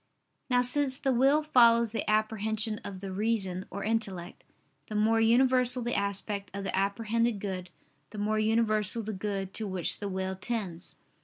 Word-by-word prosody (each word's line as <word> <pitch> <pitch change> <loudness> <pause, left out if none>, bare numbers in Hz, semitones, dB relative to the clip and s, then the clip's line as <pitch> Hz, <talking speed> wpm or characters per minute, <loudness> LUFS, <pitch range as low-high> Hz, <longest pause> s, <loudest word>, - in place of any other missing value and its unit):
Now 250 -1 +3
since 260 +1 0
the 270 -2 0
will 275 +5 +3
follows 235 -6 +5
the 225 - -3
apprehension 215 0 0
of 190 -2 -7
the 195 -1 -5
reason 190 -2 -1
or 200 - -6
intellect; 205 -6 -3 0.4
the 215 - -6
more 225 +2 +3
universal 250 +1 +3
the 240 - -2
aspect 200 0 -3
of 200 - -4
the 190 - -2
apprehended 220 +3 0
good, 185 -3 -5 0.4
the 215 - -10
more 215 +1 0
universal 215 0 +1
the 215 +1 -4
good 195 -1 -4
to 220 - -2
which 185 -3 +3
the 205 - -4
will 190 0 -3
tends. 190 -4 -5
215 Hz, 165 wpm, -29 LUFS, 195-230 Hz, 0.4 s, follows